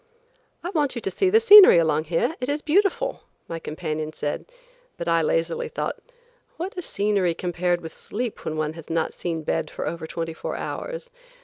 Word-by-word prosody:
"I 355 - -3
want 295 -7 0
you 235 - -4
to 195 - -2
see 380 - +2
the 435 +4 +6
scenery 420 - +10
along 155 -2 +2
here; 175 - 0
it 255 +1 -3
is 295 +1 -1
beautiful," 405 +9 +1 0.3
my 165 - -5
companion 155 -1 -4
said, 145 - -3 0.5
but 170 - -5
I 165 0 +3
lazily 165 +1 0
thought, - - -3 0.6
"What 365 +4 -5
is 360 -2 -4
scenery 200 -4 +1
compared 175 0 -1
with 160 -1 -8
sleep 235 +1 -5
when 155 - -3
one 155 0 -1
has 165 -2 -11
not 165 -1 -1
seen 165 -2 -4
bed 155 0 -1
for - - -5
over 165 -1 -4
twenty 165 0 -4
four - - -5
hours?" - - -5
175 Hz, 190 wpm, -24 LUFS, -, 0.6 s, scenery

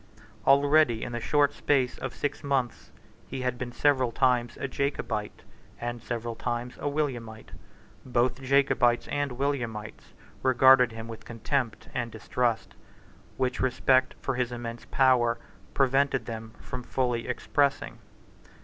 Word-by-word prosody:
Already, 140 -3 +4
in - - -5
the 120 - -3
short 145 +4 +2
space 130 -4 +1
of 130 - -5
six 145 - -3
months, 135 -4 -1 0.4
he 130 - -5
had 125 -1 -2
been 125 -1 -4
several 130 -2 +2
times 120 -1 +1
a - - -2
Jacobite, 125 -6 -3 0.4
and 120 0 -4
several 115 0 -4
times 120 +1 -4
a 145 - -2
Williamite. 125 -7 -3 0.5
Both 125 +1 0
Jacobites 130 -3 +3
and 145 -2 -1
Williamites 120 -5 -4 0.3
regarded 130 -1 +6
him 115 0 -7
with 115 -1 -9
contempt 120 0 -2
and 120 -2 -2
distrust, 115 0 -1 0.6
which 130 -1 -1
respect 130 0 +2
for 135 - -2
his 125 -1 -1
immense 120 -1 -6
power 125 -3 +3 0.4
prevented 135 0 +2
them 110 -1 -7
from 125 -2 -6
fully 125 -2 -1
expressing. 140 +3 0
125 Hz, 130 wpm, -28 LUFS, 120-135 Hz, 0.6 s, regarded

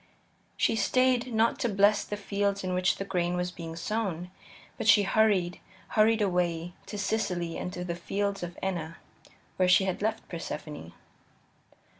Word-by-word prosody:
She - - +2
stayed 255 +1 +2
not 225 +1 +2
to 240 - +1
bless 205 0 +4
the 205 - -5
fields 200 -1 -1
in 185 0 -2
which 180 0 +2
the 195 - -4
grain 180 -2 0
was 180 0 -1
being 165 -2 -7
sown, 180 -2 -3 0.4
but - - -4
she 205 - +7
hurried, 195 -4 +2 0.3
hurried 220 0 +3
away, 175 -2 0
to 210 - -6
Sicily 180 -5 -1
and 180 - -4
to 180 0 -5
the 170 - -2
fields 200 +3 -2
of 175 0 -6
Enna, 170 -4 -3 0.6
where 185 -1 +3
she 190 +1 +6
had 190 0 -2
left 220 +1 -1
Persephone. 150 - -6
190 Hz, 160 wpm, -29 LUFS, 175-210 Hz, 0.6 s, she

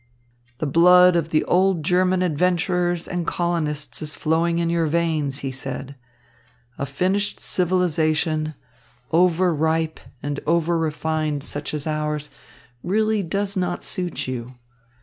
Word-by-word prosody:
"The 155 - -2
blood 180 +4 +6
of 165 -1 0
the 155 -1 +2
old 185 -2 +2
German 185 +2 +2
adventurers 175 +1 +1
and 175 -2 -3
colonists 165 -4 -1
is 150 -1 -2
flowing 165 +2 +1
in 170 0 0
your 165 -1 +1
veins," 155 -4 0
he 135 - -2
said. 135 +1 -6 0.9
"A 140 - -2
finished 190 +9 -1
civilisation, 160 -3 +1 0.6
over 180 +1 +3
ripe 160 +1 0 0.2
and 145 0 -3
over 170 +1 +2
refined 155 -2 -1
such 145 0 -3
as 145 - -2
ours, 150 -1 -2 0.5
really 215 +4 +1
does 195 +3 -2
not 180 -2 -2
suit 180 -6 -2
you. 125 0 -5
165 Hz, 130 wpm, -22 LUFS, 150-180 Hz, 0.9 s, blood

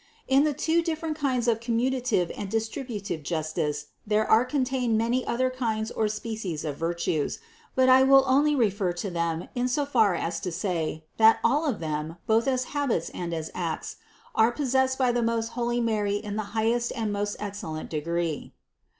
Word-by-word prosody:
559. 270 +1 +5
In - - +5
the 295 -3 0
two 330 +1 +2
different 320 -1 -2
kinds 260 -5 0
of 225 -2 +2
commutative 235 -4 0
and 200 - -5
distributive 220 - -3
justice 155 -1 -2 0.2
there 215 +1 +2
are 220 +3 +5
contained 255 -3 0
many 235 +3 +1
other 255 +2 +1
kinds 225 -4 -2
or 220 - 0
species 215 -7 -4
of 150 -2 -3
virtues, 165 -2 -1 0.4
but 260 0 +4
I 260 0 +7
will 270 0 +7
only 290 +3 +3
refer 200 -7 +1
to 180 +3 -4
them 170 -1 -2
in 245 0 0
so 280 +3 0
far 225 -9 +3
as 165 0 -2
to 180 - -4
say, 165 -3 -2
that 225 0 +7
all 300 +3 +2
of 235 - -2
them, 155 +1 -3
both 225 +2 +2
as 255 -1 +1
habits 260 - 0
and 175 -1 -5
as 160 -1 -4
acts, 170 -3 -4 0.4
were 220 +1 +5
possessed 260 0 +1
by 255 -2 +3
the 240 0 0
most 230 0 0
holy 240 0 -1
Mary 215 -3 0
in 205 0 -4
the 215 0 -4
high 220 +1 +3
est 240 0 0
and 220 -2 -1
most 205 0 -2
excellent 200 -7 -5
degree. 165 0 -2
220 Hz, 185 wpm, -27 LUFS, 175-255 Hz, 0.4 s, I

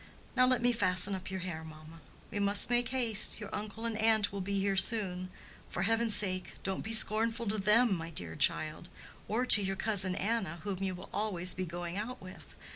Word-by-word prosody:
Now 255 0 +3
let 255 -1 0
me 245 - +3
fasten 185 -2 +2
up 190 -1 -7
your 190 -1 -6
hair, 170 -3 -7
mamma." 155 +1 -14 0.3
"We 205 - -5
must 200 +3 +4
make 240 -1 0
haste; 235 -6 +1
your 210 -2 -10
uncle 215 +2 -7
and 230 -1 -3
aunt 220 -2 +1
will 200 - -5
be 200 +1 -3
here 195 0 -1
soon. 190 -4 +2 0.4
For 175 - -4
heaven's 225 0 +2
sake, 185 -3 -1
don't 190 -1 -4
be 220 - -6
scornful 225 +1 +5
to 215 +1 -2
them, 210 +3 +2
my 165 0 -7
dear 85 - -7
child! 155 - 0 0.4
or 235 +4 -2
to 215 - +7
your 195 0 -3
cousin 190 -3 +1
Anna, 195 -5 -3
whom 195 -2 -5
you 190 -1 -3
will 180 +2 -13
always 185 -4 -1
be 185 0 -6
going 175 +1 -7
out 230 +5 -6
with. 185 0 -14
200 Hz, 205 wpm, -30 LUFS, 185-225 Hz, 0.4 s, to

